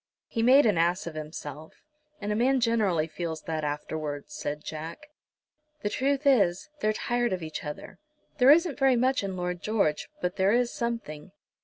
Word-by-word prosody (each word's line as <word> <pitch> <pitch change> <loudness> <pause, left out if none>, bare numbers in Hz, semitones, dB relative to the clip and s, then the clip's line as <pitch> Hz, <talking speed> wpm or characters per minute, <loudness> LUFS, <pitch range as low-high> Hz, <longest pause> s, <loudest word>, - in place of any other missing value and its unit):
"He 230 - -3
made 260 +4 +6
an 205 -7 +3
ass 175 +2 +1
of 170 - -5
himself, 155 0 -8 0.4
and 210 0 -3
a - - +1
man 260 +4 +3
generally 215 -9 +2
feels 160 0 -5
that 160 -1 -3
afterwards," 150 0 -4
said 150 +1 -4
Jack. 165 - -7 0.7
"The 205 - -1
truth 275 +3 0
is, 240 - +3
they're 215 - +2
tired 240 0 0
of 180 -2 -3
each 155 -1 -5
other. 150 0 -8 0.4
There 255 +1 +6
isn't 325 -1 +5
very 270 -2 +4
much 255 -1 +2
in 190 -1 -4
Lord 180 -1 -3
George, 200 -9 0
but 180 0 -2
there 190 +2 +3
is 240 0 +2
something. 200 -8 -4
195 Hz, 175 wpm, -28 LUFS, 160-240 Hz, 0.7 s, made